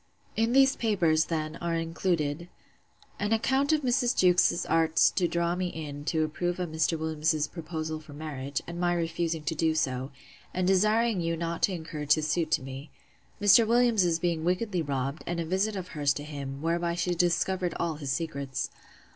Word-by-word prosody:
In 225 Hz, +2 st, +1 dB
these 270 Hz, 0 st, +5 dB
papers, 170 Hz, -8 st, +2 dB
then, 155 Hz, 0 st, -3 dB
are 170 Hz, -1 st, -2 dB
included, 165 Hz, -1 st, -1 dB, 0.7 s
'An 205 Hz, +2 st, 0 dB
account 265 Hz, +6 st, +2 dB
of 310 Hz, -1 st, +2 dB
Mrs. 245 Hz, 0 st, +1 dB
Jewkes's 180 Hz, -1 st, +4 dB
arts 165 Hz, 0 st, +3 dB
to 180 Hz, -3 st, +1 dB
draw 170 Hz, 0 st, 0 dB
me 185 Hz, 0 st, -1 dB
in 145 Hz, -4 st, -7 dB
to 160 Hz, 0 st, +1 dB
approve 175 Hz, +3 st, -2 dB
of 180 Hz, -2 st, -2 dB
Mr. 160 Hz, +1 st, +1 dB
Williams's 155 Hz, -1 st, 0 dB
proposal 160 Hz, -1 st, -5 dB
for 155 Hz, -1 st, -13 dB
marriage; 140 Hz, -2 st, -5 dB
and 170 Hz, 0 st, -7 dB
my 175 Hz, 0 st, +1 dB
refusing 165 Hz, -1 st, -2 dB
to 160 Hz, +2 st, -1 dB
do 160 Hz, 0 st, +1 dB
so; 130 Hz, -3 st, -1 dB, 0.5 s
and 185 Hz, 0 st, +1 dB
desiring 210 Hz, +2 st, +3 dB
you 165 Hz, 0 st, -1 dB
not 170 Hz, 0 st, -3 dB
to 195 Hz, -, +2 dB
encourage 155 Hz, -3 st, 0 dB
his 155 Hz, -1 st, 0 dB
suit 160 Hz, 0 st, 0 dB
to 130 Hz, -, +1 dB
me. 135 Hz, +3 st, -8 dB, 0.5 s
Mr. 215 Hz, +2 st, +6 dB
Williams's 225 Hz, -8 st, +3 dB
being 170 Hz, -2 st, -1 dB
wickedly 180 Hz, +1 st, 0 dB
robbed, 140 Hz, 0 st, -3 dB
and 175 Hz, 0 st, -2 dB
a 165 Hz, -, -2 dB
visit 190 Hz, +5 st, 0 dB
of 185 Hz, -2 st, -5 dB
hers 145 Hz, -3 st, +1 dB
to 145 Hz, -, -6 dB
him; 140 Hz, -1 st, -6 dB
whereby 170 Hz, +1 st, 0 dB
she 175 Hz, +1 st, 0 dB
discovered 175 Hz, +1 st, 0 dB
all 165 Hz, -3 st, -1 dB
his 140 Hz, -3 st, -4 dB
secrets. 140 Hz, -4 st, -3 dB
165 Hz, 180 wpm, -28 LUFS, 155-180 Hz, 0.7 s, Mr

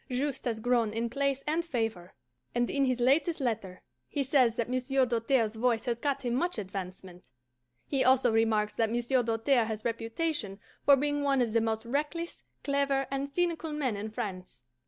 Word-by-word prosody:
Juste 270 Hz, +2 st, -2 dB
has 230 Hz, -3 st, -1 dB
grown 235 Hz, -2 st, +2 dB
in 230 Hz, +1 st, -2 dB
place 275 Hz, +1 st, 0 dB
and 320 Hz, +3 st, 0 dB
favour, 225 Hz, -, -3 dB, 0.4 s
and 240 Hz, 0 st, +1 dB
in 280 Hz, -1 st, +2 dB
his 255 Hz, -1 st, 0 dB
latest 300 Hz, +7 st, +2 dB
letter 215 Hz, -8 st, -3 dB, 0.2 s
he 285 Hz, -, -1 dB
says 255 Hz, -4 st, +3 dB
that 235 Hz, -, -1 dB
Monsieur 255 Hz, +1 st, +1 dB
Doltaire's 230 Hz, -1 st, +1 dB
voice 230 Hz, 0 st, 0 dB
has 235 Hz, -2 st, -1 dB
got 275 Hz, 0 st, -1 dB
him 240 Hz, -, 0 dB
much 345 Hz, +6 st, 0 dB
advancement. 185 Hz, -2 st, -7 dB, 0.6 s
He 270 Hz, -2 st, +1 dB
also 255 Hz, -1 st, +4 dB
remarks 220 Hz, -2 st, +2 dB
that 225 Hz, -1 st, +1 dB
Monsieur 240 Hz, +3 st, +1 dB
Doltaire 230 Hz, +2 st, +2 dB
has 220 Hz, -1 st, -5 dB
reputation 230 Hz, -1 st, -2 dB, 0.2 s
for 280 Hz, -, +7 dB
being 290 Hz, +1 st, 0 dB
one 280 Hz, -1 st, +2 dB
of 235 Hz, -3 st, +1 dB
the 230 Hz, -, +3 dB
most 220 Hz, 0 st, -1 dB
reckless, 300 Hz, +7 st, -3 dB, 0.2 s
clever, 280 Hz, -1 st, +1 dB
and 275 Hz, +1 st, -2 dB
cynical 335 Hz, -1 st, -1 dB
men 270 Hz, -7 st, -1 dB
in 205 Hz, +2 st, -4 dB
France. 185 Hz, -, -6 dB
245 Hz, 175 wpm, -30 LUFS, 225-275 Hz, 0.6 s, for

